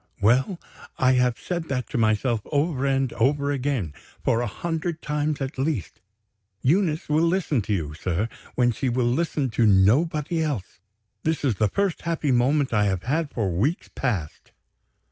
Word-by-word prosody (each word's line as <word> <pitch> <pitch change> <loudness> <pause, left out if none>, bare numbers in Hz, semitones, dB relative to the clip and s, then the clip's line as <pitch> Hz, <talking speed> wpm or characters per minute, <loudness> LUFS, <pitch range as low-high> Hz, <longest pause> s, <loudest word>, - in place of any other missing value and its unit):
Well! 130 - +2 0.4
I 130 0 +4
have 125 -2 +2
said 175 -2 -3
that 130 -4 -2
to - - -2
myself 110 +1 +2
over 145 -2 0
and 135 -2 +1
over 140 +4 +1
again, 130 - -1 0.3
for 115 - +2
a 120 - -1
hundred 165 - -3
times 150 0 -1
at 135 0 -4
least. 135 - -2 0.6
Eunice 160 +2 +2
will 155 +3 +3
listen 165 -7 +1
to 105 - -5
you, 80 -6 -2
sir, 90 +6 -1 0.3
when 120 -1 +3
she 125 +3 -2
will 120 0 +1
listen 135 0 0
to 115 0 +3
nobody 150 - +3
else. 135 - -3 0.4
This 160 -2 -1
is 120 -8 +1
the 105 0 +2
first 200 - -1
happy 165 -4 -1
moment 130 +2 +2
I 105 -2 +3
have 95 -3 -1
had 150 +4 0
for 105 -8 -1
weeks 125 - -1
past." 100 - -3
135 Hz, 165 wpm, -24 LUFS, 115-155 Hz, 0.6 s, I